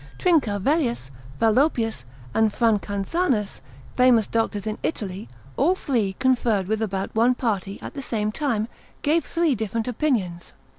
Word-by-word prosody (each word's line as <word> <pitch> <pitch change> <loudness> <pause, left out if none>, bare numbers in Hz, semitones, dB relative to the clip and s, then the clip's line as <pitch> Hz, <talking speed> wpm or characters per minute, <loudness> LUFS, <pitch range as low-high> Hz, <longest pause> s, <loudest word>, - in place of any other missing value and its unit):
Trincavellius, 250 - +1 0.3
Fallopius, 225 - +2 0.3
and 220 -1 +3
Francanzanus, 215 - 0 0.3
famous 250 -4 +5
doctors 225 -2 -1
in 215 -1 -3
Italy, 195 - -4 0.3
all 335 +8 +3
three 230 - 0
conferred 240 -7 +2
with 220 +1 -1
about 195 -3 -2
one 235 +3 +3
party, 200 -5 -2
at - - -7
the 275 - -5
same 215 -4 -1
time, 225 -5 -1 0.4
gave 320 +3 +3
three 335 -3 +1
different 225 0 -2
opinions. 215 - -1
225 Hz, 130 wpm, -24 LUFS, 205-260 Hz, 0.4 s, famous